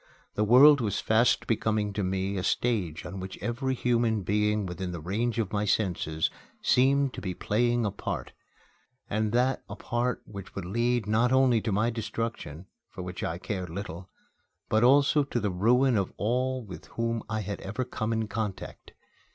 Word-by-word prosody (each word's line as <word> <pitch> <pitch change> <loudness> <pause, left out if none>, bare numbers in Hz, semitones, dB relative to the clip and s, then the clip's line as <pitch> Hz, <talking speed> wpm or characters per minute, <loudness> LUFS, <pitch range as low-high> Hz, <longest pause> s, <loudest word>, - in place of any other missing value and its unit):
The 105 - 0
world 135 +6 +7
was 105 -3 -1
fast 110 +2 +3
becoming 105 -2 0
to 100 0 -2
me 95 +1 -1
a 95 - -1
stage 95 -5 -1
on 95 +2 -6
which 95 0 -7
every 130 +3 -2
human 115 -4 +1
being 105 +1 +1
within 90 0 -4
the 85 - -5
range 110 +9 -1
of 110 -4 -1
my 105 0 +1
senses 90 -6 0 0.3
seemed 135 +1 +3
to - - -7
be 90 -1 -4
playing 120 +2 +1
a 100 - 0
part, 100 - -5 0.8
and 110 0 0
that 125 +3 +2
a - - -6
part 120 +1 -2
which 100 -3 -10
would 100 - -4
lead 120 +3 0
not 110 +4 +2
only 130 -4 +4
to 110 - -2
my 110 +4 +1
destruction 110 -7 -4 0.2
(for 90 - -8
which 90 0 -6
I 80 - -2
cared 90 -1 -4
little), 90 0 -7 0.6
but 110 +1 +3
also 140 +3 +5
to 135 -3 -2
the 105 -3 -1
ruin 120 +7 +3
of 95 -2 -1
all 125 +3 -1
with 95 - -9
whom 115 0 0
I 110 -1 -1
had 100 -1 -5
ever 110 +6 -3
come 115 -2 -3
in 110 -1 -1
contact. 105 -3 -5
110 Hz, 180 wpm, -28 LUFS, 95-120 Hz, 0.8 s, world